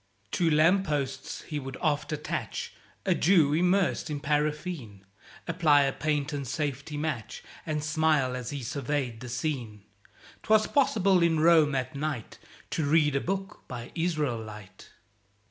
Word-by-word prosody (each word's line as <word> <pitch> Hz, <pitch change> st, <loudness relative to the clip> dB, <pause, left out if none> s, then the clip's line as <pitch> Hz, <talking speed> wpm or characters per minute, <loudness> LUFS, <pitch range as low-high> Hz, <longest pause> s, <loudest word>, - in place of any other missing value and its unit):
To 175 Hz, -4 st, +2 dB
lamp 170 Hz, +6 st, +4 dB
posts 145 Hz, -3 st, -3 dB
he 150 Hz, -2 st, -4 dB
would 135 Hz, -1 st, -7 dB
oft 155 Hz, -2 st, 0 dB
attach 150 Hz, 0 st, -4 dB, 0.3 s
A -, -, +3 dB
Jew, 160 Hz, -5 st, +4 dB
immersed 180 Hz, +2 st, +2 dB
in 150 Hz, -1 st, -3 dB
paraffine, 150 Hz, -, -2 dB, 0.4 s
Apply 160 Hz, -4 st, +4 dB
a 135 Hz, -1 st, 0 dB
patent 145 Hz, -2 st, -2 dB
safety 145 Hz, +1 st, -3 dB
match, 140 Hz, -7 st, -4 dB, 0.2 s
And 150 Hz, -1 st, -1 dB
smile 150 Hz, -4 st, +2 dB
as 125 Hz, -1 st, -5 dB
he 140 Hz, -3 st, -5 dB
surveyed 135 Hz, -2 st, -2 dB
the 125 Hz, 0 st, -8 dB
scene. 120 Hz, -5 st, -3 dB, 0.6 s
('Twas 215 Hz, 0 st, +4 dB
possible 195 Hz, -9 st, +3 dB
in 165 Hz, -2 st, +3 dB
Rome 155 Hz, -3 st, +5 dB
at 130 Hz, +3 st, -2 dB
night 140 Hz, -5 st, -4 dB, 0.3 s
To 160 Hz, -, 0 dB
read 150 Hz, -1 st, +3 dB
a 140 Hz, -, +1 dB
book 195 Hz, +1 st, -4 dB
by 120 Hz, -2 st, -7 dB
Israelight.) 120 Hz, -, -3 dB
150 Hz, 140 wpm, -28 LUFS, 135-160 Hz, 0.6 s, Rome